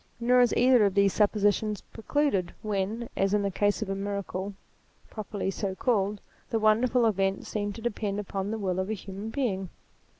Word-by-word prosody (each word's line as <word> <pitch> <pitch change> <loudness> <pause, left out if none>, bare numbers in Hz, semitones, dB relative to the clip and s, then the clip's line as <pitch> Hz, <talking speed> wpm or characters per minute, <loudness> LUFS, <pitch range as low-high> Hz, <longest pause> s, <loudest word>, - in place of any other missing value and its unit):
Nor 250 +1 +4
is 245 - +4
either 250 -2 +6
of 195 - 0
these 200 -1 +4
suppositions 210 0 +2
precluded 225 -6 -1
when, 215 +3 -2
as 195 +1 +2
in 205 - +1
the 200 - 0
case 205 +3 +1
of 205 - -7
a - - 0
miracle 200 0 -4 0.6
properly 205 -2 -3
so 195 -1 -3
called, 205 -3 0 0.3
the 225 - +1
wonderful 230 +3 +3
event 195 -2 +1
seemed 205 -1 -3
to 225 - -9
depend 210 -3 -2
upon 195 -1 -3
the 220 - -2
will 185 -3 -1
of 190 +2 -2
a - - 0
human 195 +1 -6
being. 205 -8 -2
205 Hz, 180 wpm, -28 LUFS, 195-225 Hz, 0.6 s, either